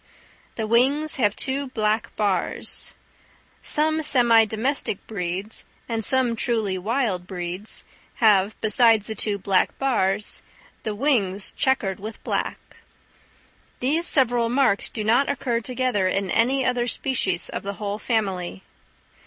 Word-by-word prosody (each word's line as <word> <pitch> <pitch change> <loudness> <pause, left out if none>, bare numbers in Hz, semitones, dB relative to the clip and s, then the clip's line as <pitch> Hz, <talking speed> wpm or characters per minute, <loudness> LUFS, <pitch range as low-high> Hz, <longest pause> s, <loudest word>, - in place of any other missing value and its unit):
The 220 - -2
wings 270 +7 +2
have 210 -5 +2
two 275 +1 -2
black 220 -2 -1
bars. 200 -4 -2 0.7
Some 315 +1 +1
semi 240 -6 +5
domestic 220 0 -1
breeds, 195 +1 -4 0.2
and 225 -1 -2
some 255 0 +2
truly 220 -4 -1
wild 200 -2 -1
breeds, 180 +2 -4 0.3
have, 210 -2 +3
besides 220 -1 +4
the 220 - -4
two 210 -1 +1
black 195 -1 +1
bars, 210 -6 0 0.4
the 215 -1 -4
wings 205 -7 +1
chequered 225 -8 0
with 215 +3 -8
black. - - -4 1.0
These 310 +7 +1
several 240 -4 +3
marks 250 -5 +2
do 215 - -4
not 235 +6 +2
occur 240 -4 -1
together 245 -4 -1
in 195 0 -1
any 260 +3 +2
other 245 -1 0
species 215 -9 +1
of - - -4
the 200 0 -5
whole 205 0 -4
family. 190 - -2
220 Hz, 130 wpm, -23 LUFS, 200-255 Hz, 1.0 s, semi